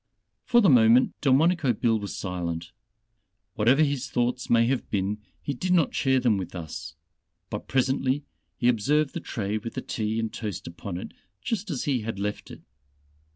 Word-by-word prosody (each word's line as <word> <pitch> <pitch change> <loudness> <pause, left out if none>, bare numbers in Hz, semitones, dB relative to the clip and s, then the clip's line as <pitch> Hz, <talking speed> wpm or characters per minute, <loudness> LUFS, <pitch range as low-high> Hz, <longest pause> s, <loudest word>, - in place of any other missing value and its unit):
For 240 -1 +5
the 200 - +5
moment 120 0 +5
Delmonico 145 0 +3
Bill 115 0 +1
was 100 -4 -6
silent 85 -3 -4 0.8
whatever 125 +6 +4
his 140 -3 -1
thoughts 125 +1 -1
may 115 0 +5
have 130 +1 -1
been, 100 +1 -1 0.2
he 140 - -2
did 180 +8 -1
not 170 -4 +3
share 130 -1 +2
them 120 -5 +2
with 95 -1 -6
us. 80 -2 -7 0.6
But - - -5
presently, 135 +1 +1 0.3
he 120 - +1
observed 135 +6 +2
the - - -3
tray 110 -8 -3
with 115 +2 -7
the - - -2
tea 110 0 -2
and 110 -1 -3
toast 105 -6 -5
upon 85 +2 -6
it, 90 - -7 0.3
just 210 - -3
as 140 -7 -2
he 135 -5 0
had 110 -1 -4
left 105 +1 -4
it. - - -11
120 Hz, 175 wpm, -26 LUFS, 105-135 Hz, 0.8 s, For